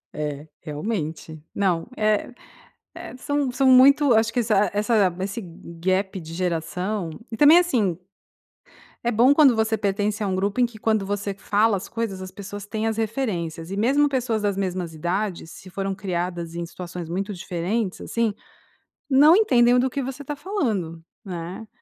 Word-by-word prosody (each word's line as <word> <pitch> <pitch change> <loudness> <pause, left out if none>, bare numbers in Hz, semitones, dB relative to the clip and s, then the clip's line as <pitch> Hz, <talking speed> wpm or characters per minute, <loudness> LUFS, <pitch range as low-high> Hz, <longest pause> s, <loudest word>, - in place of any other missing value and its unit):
É, 150 0 -4
realmente 160 -2 -5
não, 180 -5 0
eh, 215 +2 +1 0.9
são 285 +1 -1
são 255 +2 0
muito 265 +1 +6
acho 225 +1 +2
que 245 - +2
essa 210 -3 +2
essa 205 -3 +2
esse 195 +4 -3
gap 185 +2 -3
de 165 -1 -9
geração 180 +2 -2 0.2
e 225 - -5
também, 300 +6 +8
assim, 225 - +1 1.1
é 240 - +1
bom 245 +5 +5
quando 285 -4 +6
você 220 0 +1
pertence 205 +1 -1
a - - -1
um 190 - -1
grupo 200 +5 -1
em 245 - +5
que 235 -2 -13
quando 215 -2 0
você 200 0 -2
fala 205 +2 +1
as 190 - -6
coisas 225 -5 -4
as 185 0 -8
pessoas 200 +1 -8
têm 220 +1 -2
as 220 - -2
referências, 190 -8 -3
e 195 - -4
mesmo 275 +8 +3
pessoas 250 -5 -1
das 200 -2 0
mesmas 185 -3 -3
idades 175 +1 -3
se 185 - -12
foram 195 +1 -3
criadas 175 -3 -4
em 170 - -3
situações 175 0 -7
muito 195 +5 -3
diferentes, 185 +3 -3
assim, 230 -3 -1 0.8
não 290 +5 +7
entendem 250 - +4
do 260 - +2
que 275 +2 -3
você 265 +2 -6
está 290 +1 -5
falando, 220 - -2 0.2
né? 180 +3 -6
205 Hz, 165 wpm, -23 LUFS, 180-235 Hz, 1.1 s, também